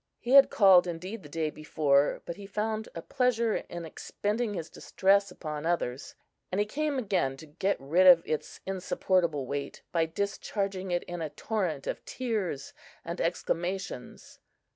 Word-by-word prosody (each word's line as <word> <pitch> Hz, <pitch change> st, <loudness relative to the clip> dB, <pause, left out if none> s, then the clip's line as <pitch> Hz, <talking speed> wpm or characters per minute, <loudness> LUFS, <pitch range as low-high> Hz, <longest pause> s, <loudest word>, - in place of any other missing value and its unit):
He 240 Hz, -, -4 dB
had 275 Hz, 0 st, +9 dB
called, 190 Hz, -4 st, +6 dB
indeed, 185 Hz, +6 st, -5 dB
the 150 Hz, -, -12 dB
day 155 Hz, 0 st, -1 dB
before, 145 Hz, -2 st, +1 dB
but 170 Hz, -, -5 dB
he 200 Hz, +1 st, -10 dB
found 215 Hz, +2 st, -2 dB
a 165 Hz, -, -6 dB
pleasure 235 Hz, -3 st, +1 dB
in 170 Hz, -1 st, -7 dB
expending 210 Hz, +7 st, -3 dB
his 165 Hz, -3 st, -4 dB
distress 200 Hz, +1 st, +2 dB
upon 155 Hz, -4 st, -6 dB
others, 155 Hz, -6 st, -2 dB, 0.4 s
and 185 Hz, -, -1 dB
he 205 Hz, -, +3 dB
came 295 Hz, +6 st, -1 dB
again 190 Hz, -, 0 dB
to 160 Hz, -, -11 dB
get 180 Hz, +6 st, -1 dB
rid 170 Hz, +8 st, +3 dB
of 170 Hz, -2 st, +9 dB
its 155 Hz, -1 st, -4 dB
insupportable 185 Hz, -5 st, 0 dB
weight 140 Hz, +1 st, -5 dB
by 165 Hz, -1 st, +2 dB
discharging 195 Hz, +1 st, -3 dB
it 175 Hz, -1 st, 0 dB
in 175 Hz, -1 st, -6 dB
a 155 Hz, -, -2 dB
torrent 180 Hz, -7 st, -2 dB
of -, -, -4 dB
tears 210 Hz, -, -3 dB, 0.3 s
and -, -, -4 dB
exclamations. 180 Hz, -7 st, -3 dB
180 Hz, 160 wpm, -29 LUFS, 160-205 Hz, 0.4 s, had